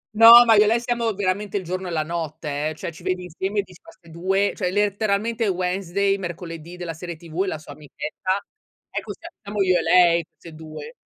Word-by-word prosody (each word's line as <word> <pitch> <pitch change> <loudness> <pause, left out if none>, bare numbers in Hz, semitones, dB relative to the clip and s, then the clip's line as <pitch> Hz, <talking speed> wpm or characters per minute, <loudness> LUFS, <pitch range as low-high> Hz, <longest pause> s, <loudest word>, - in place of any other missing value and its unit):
No, 230 +2 +10
ma 225 - +6
io 210 0 +6
e - - +1
lei 230 +2 +3
siamo 235 -1 -1
veramente 200 +1 -1
il 195 - -4
giorno 185 +2 -4
e - - -5
la 155 -2 0
notte, 155 -2 -3
eh, 155 - -7
cioè 170 - -6
ci 165 - -14
vedi 185 0 -2
insieme 190 +4 -3
e - - +4
dici: 180 -2 -17
"Ma - - -15
'ste 170 -3 -21
2?", 190 +4 0
cioè 180 -3 -1
letteralmente 210 +3 0
Wednesday, 190 +1 0
mercoledì 170 -2 -7
della 175 -2 -5
serie 170 +1 -7
TV 165 +2 -5
e - - -5
la 160 - -2
sua 155 -1 -12
amichetta, 155 +6 -4 0.5
ecco, - - -4
sia 335 - -10
siamo 205 0 -1
io 185 -1 +3
e - - 0
lei, 170 -2 +4
queste 165 -2 -14
2. 160 - -9
185 Hz, 220 wpm, -23 LUFS, 165-205 Hz, 0.5 s, No